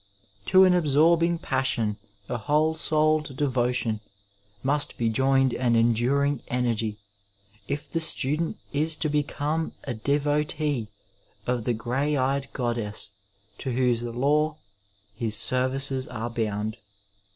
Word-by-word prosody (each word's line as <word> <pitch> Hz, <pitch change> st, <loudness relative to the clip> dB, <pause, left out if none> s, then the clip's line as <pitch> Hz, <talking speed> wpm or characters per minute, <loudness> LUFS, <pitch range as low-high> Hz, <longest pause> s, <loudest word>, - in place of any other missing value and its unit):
To 190 Hz, 0 st, +7 dB
an 185 Hz, -1 st, +6 dB
absorbing 170 Hz, +1 st, +3 dB
passion, 130 Hz, -8 st, 0 dB, 0.3 s
a 125 Hz, -, -3 dB
whole 150 Hz, +7 st, +2 dB
souled 155 Hz, -3 st, +1 dB
devotion, 125 Hz, -5 st, 0 dB, 0.6 s
must 145 Hz, +2 st, +1 dB
be 115 Hz, -1 st, +1 dB
joined 135 Hz, +2 st, +3 dB
an 120 Hz, -2 st, +1 dB
enduring 120 Hz, +5 st, +2 dB
energy, 115 Hz, -4 st, -1 dB, 0.7 s
if 145 Hz, +1 st, -3 dB
the 165 Hz, -, -2 dB
student 160 Hz, 0 st, 0 dB, 0.2 s
is 155 Hz, +2 st, +1 dB
to 155 Hz, -, 0 dB
be 150 Hz, 0 st, +2 dB
come 155 Hz, +2 st, -2 dB
a 125 Hz, -, -3 dB
devotee 145 Hz, +1 st, 0 dB, 0.6 s
of 120 Hz, -2 st, -1 dB
the 120 Hz, -, +1 dB
grey 135 Hz, +6 st, -1 dB
eyed 135 Hz, +1 st, 0 dB
goddess 115 Hz, -5 st, -3 dB, 0.5 s
to 130 Hz, -, -3 dB
whose 125 Hz, -2 st, +2 dB
law 145 Hz, +6 st, +1 dB, 0.6 s
his 110 Hz, -1 st, -1 dB
services 130 Hz, +3 st, 0 dB
are 115 Hz, +2 st, -4 dB
bound. 110 Hz, -1 st, -2 dB
135 Hz, 120 wpm, -26 LUFS, 120-150 Hz, 0.7 s, To